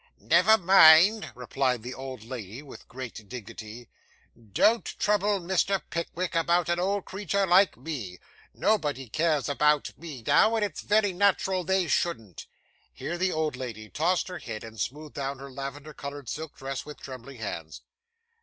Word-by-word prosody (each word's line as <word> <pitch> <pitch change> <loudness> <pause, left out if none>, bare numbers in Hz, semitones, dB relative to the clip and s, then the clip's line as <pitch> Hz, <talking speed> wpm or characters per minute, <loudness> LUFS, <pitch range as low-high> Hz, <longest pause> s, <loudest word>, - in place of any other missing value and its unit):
'Never 220 +4 +5
mind,' 190 +2 +7
replied 125 -1 -1
the 125 +1 -6
old 130 -4 -8
lady, 115 +1 -7
with 140 - -13
great 120 -5 -8
dignity. 115 -1 -9 0.5
'Don't 120 - +2
trouble 205 -1 +2
Mr. 190 +2 +1
Pickwick 170 +1 -3
about 170 +1 +2
an 175 0 +1
old 195 +2 0
creetur 200 0 -1
like 185 0 +4
me. 120 - -6 0.3
Nobody 145 - 0
cares 155 +4 0
about 150 0 +2
me 150 -7 -8
now, 220 +1 +4
and 215 -2 +2
it's 205 - -6
very 210 -2 +2
nat'ral 190 -1 +2
they 190 +1 +1
shouldn't.' 115 - -2 0.4
Here 65 - -5
the 185 +1 0
old 155 -3 -1
lady 115 -4 -7
tossed 175 +4 0
her 185 - -6
head, 115 -4 -7
and 110 -1 -10
smoothed 150 +7 -4
down 140 0 -3
her 135 +1 -10
lavender 140 +3 -7
coloured 140 -3 -7
silk 160 0 -6
dress 135 -1 -5
with 150 0 -10
trembling 130 0 -9
hands. 85 -8 -6
150 Hz, 155 wpm, -27 LUFS, 125-185 Hz, 0.5 s, mind